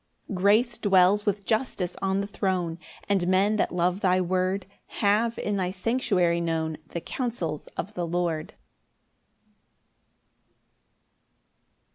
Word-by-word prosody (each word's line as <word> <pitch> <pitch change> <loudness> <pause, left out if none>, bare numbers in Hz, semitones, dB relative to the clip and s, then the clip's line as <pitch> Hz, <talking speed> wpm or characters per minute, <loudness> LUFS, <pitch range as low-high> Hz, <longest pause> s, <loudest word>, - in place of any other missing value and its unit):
10 195 - -5
Grace 215 +5 +3
dwells 200 +1 +4
with 200 -1 0
justice 215 -6 -1
on 195 0 +1
the - - -2
throne; 185 -4 -2 0.3
And 195 -3 +1
men 195 +3 +3
that - - +1
love 180 +1 +1
thy 185 -2 +3
word 185 +1 0 0.3
Have 220 +3 +2
in 205 -1 -1
thy 185 -2 0
sanctuary 185 -4 +1
known 160 -2 -2
The 170 - -5
counsels 185 - -3
of 205 +5 -4
the 175 -3 -3
Lord. 170 -2 -2
190 Hz, 120 wpm, -26 LUFS, 175-205 Hz, 0.3 s, dwells